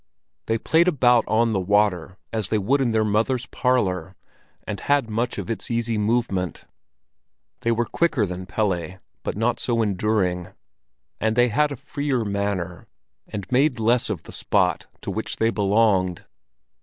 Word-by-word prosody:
They 115 - +1
played 160 +9 +3
about 125 -8 +4
on 115 +1 +2
the 100 - +1
water 95 -2 +1 0.2
as 110 -4 -1
they 110 - +2
would 130 +8 +1
in 125 -3 +1
their 110 -1 +2
mother's 115 +4 +1
parlor, 95 -10 0 0.5
and 100 - -4
had 140 -6 +1
much 120 +3 -1
of 100 -4 -4
its 110 -4 -3
easy 115 -1 0
movement. 105 -4 -1 0.9
They 115 - 0
were 115 +1 +1
quicker 150 -5 +1
than 90 0 -6
Pelle, 95 -3 -1 0.2
but - - -4
not 115 +2 +1
so 115 -2 +1
enduring; 95 -3 0 0.7
and 110 0 +1
they 120 0 +4
had 150 +6 +2
a - - -3
freer 135 -2 -2
manner, 100 -4 -3 0.4
and 100 -2 -5
made 130 0 +3
less 115 +2 +2
of - - -3
the - - -11
spot - - 0
to - - -4
which - - -3
they 115 0 +1
belonged. 100 -4 +2
110 Hz, 160 wpm, -23 LUFS, 100-120 Hz, 0.9 s, about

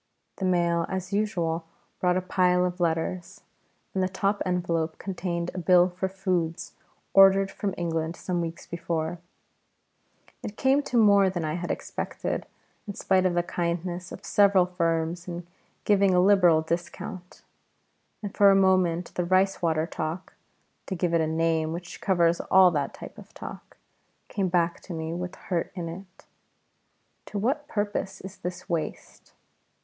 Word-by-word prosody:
The 190 - -2
mail 170 -2 +2
as 190 +1 -4
usual 175 -6 0 0.4
brought 180 0 +2
a 185 - -1
pile 180 -1 +2
of 180 0 -3
letters, 170 +1 -2 0.5
and 190 - 0
the 185 - +1
top 195 +2 -1
envelope 170 -3 -1
contained 175 -2 -3
a 185 - -4
bill 180 +1 +5
for 185 +1 -3
foods 185 -4 -2 0.4
ordered 195 0 +6
from 200 -2 -3
England 165 -1 -2
some 175 -1 -2
weeks 165 0 -5
before. 165 0 -3 1.2
It 205 - -7
came 270 +2 +3
to 255 -4 -2
more 200 -3 +6
than 175 -3 -3
I 155 - -2
had 175 +1 -4
expected, - - -4 0.4
in 200 - -5
spite 185 -1 +2
of 175 - -1
the 175 - +2
kindness 175 0 -3
of - - -9
several 200 -3 +4
firms 170 -1 -1
in 175 -1 -6 0.4
giving 200 -2 +3
a - - +5
liberal 180 -4 +5
discount; 175 +2 -5 0.8
and 205 - -5
for 200 -1 +7
a 195 - +6
moment 185 -3 +2
the 180 - -1
rice 185 +2 +2
water 160 -2 +1
talk 165 +2 -5 0.5
(to 190 - -3
give 175 -1 -1
it 165 - +3
a 160 - +1
name 160 0 0
which 175 +1 -8
covers 170 -3 +2
all 185 -1 +7
that 145 -4 -2
type - - -10
of - - -15
talk) - - -10 0.5
came 195 -3 -1
back 170 -1 +1
to 185 - -8
me 160 0 -4
with 180 +1 -5
hurt 175 -3 -3
in 175 -3 -4
it: 185 +3 -10 1.0
"To 210 - -5
what 275 +8 -1
purpose 205 -4 -2
is 190 +1 -9
this 180 +1 -6
waste?" 165 -3 -5
180 Hz, 160 wpm, -26 LUFS, 170-190 Hz, 1.2 s, for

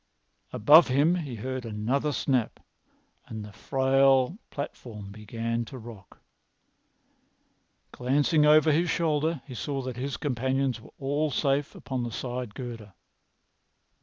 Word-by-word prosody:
Above 150 +10 +7
him 145 +6 +3
he 150 -9 -3
heard 130 +3 -4
another 115 +7 -1
snap, 130 -4 0 0.7
and 110 -2 -6
the 105 - -11
frail 135 - +2
platform 110 -7 -7
began 115 +3 -3
to 130 +3 -9
rock. 110 -5 -12 1.7
Glancing 145 +5 +2
over 155 +1 +6
his 165 +3 +2
shoulder, 160 -2 0
he 130 - -9
saw 135 +3 -3
that 125 -1 -5
his 130 -1 -3
companions 130 -2 -1
were - - -14
all 145 +3 0
safe 140 +1 0
upon 130 -2 -4
the 120 - -3
side 125 -2 -5
girder. 115 -6 -7
130 Hz, 125 wpm, -27 LUFS, 115-145 Hz, 1.7 s, Above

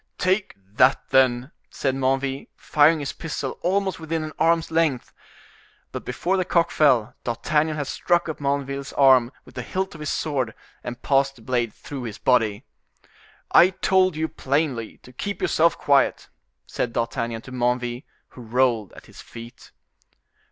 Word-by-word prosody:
"Take 190 +2 0 0.2
that, 130 +2 +3
then!" 130 +1 +3 0.2
said 135 -2 -1
Menneville, 135 +1 -1
firing 150 +1 +3
his 140 - -4
pistol 150 -4 -5
almost 190 0 0
within 160 0 -3
an 155 -1 -6
arm's 165 +1 +2
length. 160 -6 0 0.8
But - - -7
before 175 +9 -1
the 185 - +1
cock 170 -2 +1
fell, 125 -6 +3
D'Artagnan 150 +6 0
had 145 -2 -3
struck 175 +5 0
up 160 - -5
Menneville's 140 -1 -2
arm 130 -3 +5
with - - -16
the - - -5
hilt 190 +1 -3
of 160 - -11
his 150 -2 -4
sword 130 -8 -2 0.3
and 120 0 -7
passed 135 0 +2
the 115 - -17
blade 120 -2 -1
through 140 +5 -8
his 110 -2 -6
body. 110 -5 +1 0.9
"I 175 - +7
told 185 -1 +2
you 160 +1 -1
plainly 135 -6 -2
to 125 - -15
keep 200 +8 -4
yourself 165 +1 +2
quiet," 140 -1 +2 0.4
said 115 - -3
D'Artagnan 115 0 -2
to 130 - -11
Menneville, 120 0 -1 0.3
who 125 - -13
rolled 115 -2 0
at - - -14
his - - -13
feet. 115 +1 -12
135 Hz, 160 wpm, -23 LUFS, 125-160 Hz, 0.9 s, I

